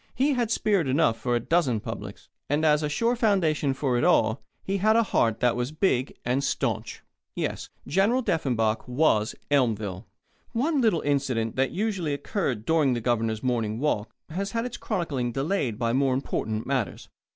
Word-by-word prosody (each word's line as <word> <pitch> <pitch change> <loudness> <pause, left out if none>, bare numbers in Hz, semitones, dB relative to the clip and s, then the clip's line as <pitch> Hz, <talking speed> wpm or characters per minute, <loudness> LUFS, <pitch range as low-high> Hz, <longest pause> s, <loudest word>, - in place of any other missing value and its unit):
He 280 +3 +2
had 240 -4 0
spirit 200 -7 +1
enough 135 -3 +3
for 120 -1 0
a - - +2
dozen 130 -3 +1
publics. - - -7 0.2
And 150 +3 +1
as 150 -1 +4
a 150 - -1
sure 230 +10 +1
foundation 175 - +2
for 130 -3 0
it - - 0
all, 110 +3 +3 0.2
he 195 +1 -1
had 215 +3 +3
a 230 - +5
heart 115 - +1
that 125 -1 +3
was 125 +3 -2
big 155 -6 0
and 125 +3 +1
stanch. - - -2 0.3
Yes; - - -3 0.2
General 205 - +2
Deffenbaugh 115 - +1
was 125 -5 +2 0.2
Elmville. 110 -9 0 0.5
One 280 +5 +1
little 215 -9 +2
incident 135 -6 0
that 135 0 +1
usually 185 -7 -1
occurred 140 - -2
during 150 -5 +3
the - - -1
Governor's 115 -2 -1
morning 115 -4 0
walk 115 -6 -1 0.2
has 195 +4 -3
had 230 +1 -1
its 245 -1 -5
chronicling 135 -9 -2
delayed 135 - -1
by 115 0 0
more 135 0 +2
important 110 -4 -2
matters. 130 -8 -2
140 Hz, 175 wpm, -26 LUFS, 120-190 Hz, 0.5 s, a